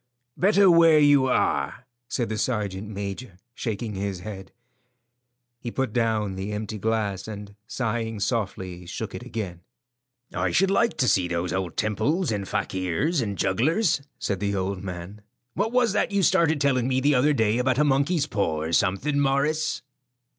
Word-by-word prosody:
"Better 200 +2 +4
where 165 -2 +6
you 145 -3 +5
are," 130 - 0 0.2
said 120 -1 -1
the 110 - -2
sergeant 105 -4 -2
major, 100 0 -6 0.2
shaking 110 -2 -4
his 95 -2 -4
head. 95 -1 -8 1.1
He 120 - -5
put 130 -2 -2
down 110 -4 0
the 95 +2 -4
empty 105 0 -4
glass, 105 -3 -1
and 105 -1 -8
sighing 115 -2 -2
softly, 95 -5 -3
shook - - -5
it - - -6
again. 90 -6 -6 0.7
"I - - 0
should 195 +1 +2
like 235 +3 +2
to 130 -4 +2
see 95 -5 +3
those 85 0 -2
old 95 -3 -3
temples 145 - 0
and 100 -2 -3
fakirs 95 - -1
and 100 -4 -3
jugglers," 145 - +1 0.2
said 100 -2 -2
the 100 0 -1
old 95 0 -2
man. 90 +2 -7 0.3
"What 210 +4 -1
was 245 -4 +2
that 210 - +1
you 200 -1 +1
started 160 -2 +3
telling 130 -3 +2
me 130 0 +1
the 145 +3 +3
other 135 +3 +3
day 110 -2 +1
about 130 0 +1
a 150 - +4
monkey's 145 +3 +2
paw 100 - -1
or 80 - -3
something, 100 - +1
Morris?" 145 +3 +1
110 Hz, 165 wpm, -25 LUFS, 100-145 Hz, 1.1 s, where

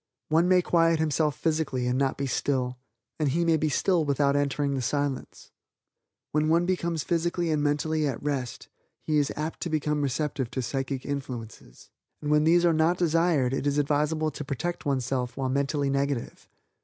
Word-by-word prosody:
One 165 +3 +3
may 180 -1 +4
quiet 165 -1 +3
himself 155 -2 +1
physically 155 -6 -1
and 125 0 0
not 135 0 0
be 140 - -2
still, 125 -2 -1 0.4
and 150 -2 +2
he 170 +5 +1
may 165 -1 +4
be 155 0 0
still 175 +3 +2
without 140 -1 +1
entering 145 0 0
the 135 - -1
Silence. 140 +2 -3 0.8
When 155 +1 +1
one 170 +2 +3
becomes 170 -3 -1
physically 170 0 0
and 150 -1 +1
mentally 150 +1 0
at 130 -4 -3
rest, 140 -4 -3 0.4
he 155 -1 +2
is 145 - 0
apt 155 +2 -4
to 175 - -3
become 150 -1 0
receptive 140 -2 -1
to 130 - -3
psychic 135 +1 -3
influences; 125 - -7 0.3
and 150 0 -3
when 150 0 +4
these 175 +2 +4
are 170 - +4
not 160 +3 +2
desired 165 -6 +2
it 135 - -1
is 145 0 +1
advisable 150 +2 +1
to - - -6
protect 165 +4 -4
oneself 130 -2 -1
while 135 -1 -1
mentally 140 +1 0
negative. 140 -2 -2
145 Hz, 180 wpm, -27 LUFS, 135-160 Hz, 0.8 s, may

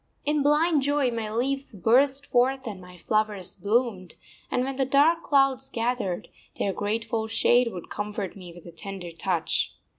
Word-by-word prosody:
In 295 0 +1
blind 300 +2 +3
joy 285 -2 +1
my 225 -2 -3
leaves 270 +2 -2
burst 270 +8 +3
forth 260 +2 +1
and 205 -5 -6
my 180 0 -13
flowers 210 0 -1
bloomed; 205 -2 -1 0.3
and 250 - 0
when 270 0 -3
the 270 - +2
dark 290 +5 +4
clouds 270 -3 +2
gathered, 230 -6 -2 0.3
their 195 - 0
grateful 220 +2 -2
shade 240 +2 +3
would 180 -4 -9
comfort 210 -2 -4
me 180 -3 -10
with 170 0 -14
a 170 - -9
tender 180 0 -7
touch. 170 0 -1
230 Hz, 160 wpm, -26 LUFS, 195-270 Hz, 0.3 s, dark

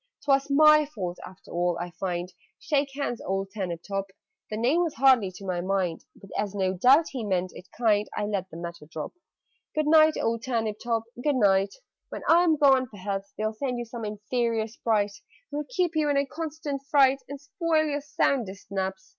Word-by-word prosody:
"'Twas 275 -1 +3
my 305 +1 +7
fault 185 -12 -5
after 185 +1 -13
all, 175 0 0
I 175 0 -5
find 180 +1 -4 0.2
Shake 285 -1 0
hands, 280 -4 -3
old 195 0 -2
Turnip 180 -5 -4
top!" 195 -1 -2 0.4
The 215 - -3
name 260 +10 +2
was 335 -4 -1
hardly 250 -5 +5
to 195 - -10
my 180 -2 -1
mind, 185 -3 -1
But, 195 - -15
as 205 -1 -2
no 190 -1 +1
doubt 260 - +5
he 255 -4 -5
meant 185 -3 -1
it 180 - -12
kind, 210 -3 +2
I - - 0
let 195 -3 -2
the 165 - -9
matter 170 -2 -7
drop. 155 -1 -6 0.6
"Good 305 0 +1
night, 310 0 +6
old 230 0 -1
Turnip 225 -4 -1
top, 230 -2 0 0.2
good 295 -2 +2
night! 195 -4 +3 0.3
When - - -7
I 340 +2 +6
am 320 -3 +3
gone, 270 -3 +5
perhaps 200 -1 -5
They'll 215 +1 -1
send 250 +2 -3
you 240 - -4
some 235 0 -7
inferior 220 +2 -1
Sprite, 215 -2 0 0.4
Who'll 295 +1 -3
keep 365 -9 +1
you 305 -1 +2
in 285 - +2
a 280 - +2
constant 300 -1 -5
fright 275 -1 +4
And 280 0 -6
spoil 310 +3 0
your 290 -1 -2
soundest 235 -9 -1
naps. 190 -1 -3
225 Hz, 195 wpm, -27 LUFS, 195-280 Hz, 0.6 s, my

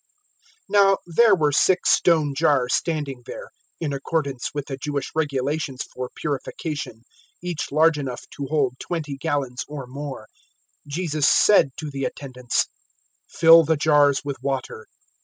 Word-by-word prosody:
002:006 - - -45 0.7
Now 195 -1 +4
there 205 +5 +4
were 150 -4 +1
six 180 +5 +3
stone 155 -5 +3
jars 135 -2 +2
standing 145 -6 -2
there - - -8 0.3
(in 150 -4 -2
accordance 140 -2 -2
with 145 -1 -4
the 135 - -5
Jewish 140 +1 -4
regulations 145 -2 -2
for 125 0 -5
purification), 145 -4 -5 0.4
each 175 -3 -4
large 155 +1 +3
enough 130 -3 -5
to 140 -2 -5
hold 135 -5 0
twenty 155 -5 -4
gallons 135 -4 -2
or 145 -3 -7
more. 135 -2 -7 0.6
002:007 - - -10
Jesus 155 -2 0
said 205 -9 +5
to 155 -2 -6
the 135 -1 -3
attendants, 125 -3 -2 0.6
"Fill 165 0 +7
the 160 0 +1
jars 145 -2 +3
with 140 -2 -4
water." 135 -5 -4
145 Hz, 145 wpm, -23 LUFS, 135-160 Hz, 0.7 s, Fill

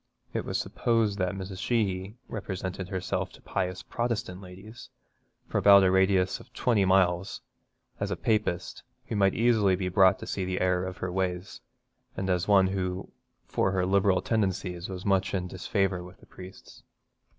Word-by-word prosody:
It - - -2
was - - -1
supposed 115 -4 0
that 90 0 0
Mrs. 95 -1 -6
Sheehy 100 -4 -1
represented 95 -3 -5
herself 95 -2 -2
to - - -16
pious 90 0 -3
Protestant 115 -5 -3
ladies, 95 +5 -12 0.6
for - - 0
about 100 -1 +7
a 95 - +4
radius 95 0 +2
of - - -16
twenty 110 -6 +2
miles, 95 -1 +2 0.6
as - - -2
a - - -1
Papist, 105 -5 -1 0.2
who - - -4
might 95 -2 +3
easily 110 -5 +3
be 90 0 -2
brought 95 0 +5
to - - -8
see 95 - -3
the 90 0 -2
error 90 0 +1
of 95 - -7
her 90 - -4
ways, 90 0 -3 0.6
and 95 0 -1
as 90 0 0
one 100 -2 +6
who 95 -1 -3 0.3
for - - 0
her 90 -1 +1
liberal 95 0 +2
tendencies 95 -5 -1
was 95 -1 -7
much 95 -1 +1
in 90 -1 -2
disfavour 95 0 -1
with 90 +1 -12
the - - -18
priests. 95 +1 -13
95 Hz, 170 wpm, -28 LUFS, 90-100 Hz, 0.6 s, about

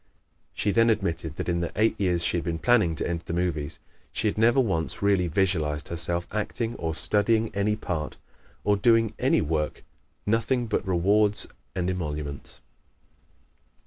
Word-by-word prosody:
She 105 - 0
then 115 +3 +4
admitted 85 -7 -1
that - - -4
in 85 -1 +1
the 85 - -2
eight 110 +2 +3
years 90 -3 +2
she - - +1
had 85 - -2
been 85 -2 -2
planning 105 -5 +3
to - - -2
enter 85 -1 -3
the - - -4
movies 85 -4 -2 0.3
she - - -1
had 105 - 0
never 120 +5 +4
once 95 -8 -1
really 100 -3 +3
visualized 80 -4 0
herself 85 +1 -2
acting, 115 +2 -2
or 80 -1 -3
studying 105 +7 +2
any 100 +1 +1
part, 90 -7 -4 0.5
or 105 - +3
doing 115 +2 +3
any - - +3
work 75 0 -2 0.4
nothing 115 +3 +1
but 110 -3 -2
rewards 100 +4 +2 0.3
and 90 -1 -1
emoluments. 75 -6 -4
90 Hz, 160 wpm, -26 LUFS, 85-105 Hz, 0.5 s, then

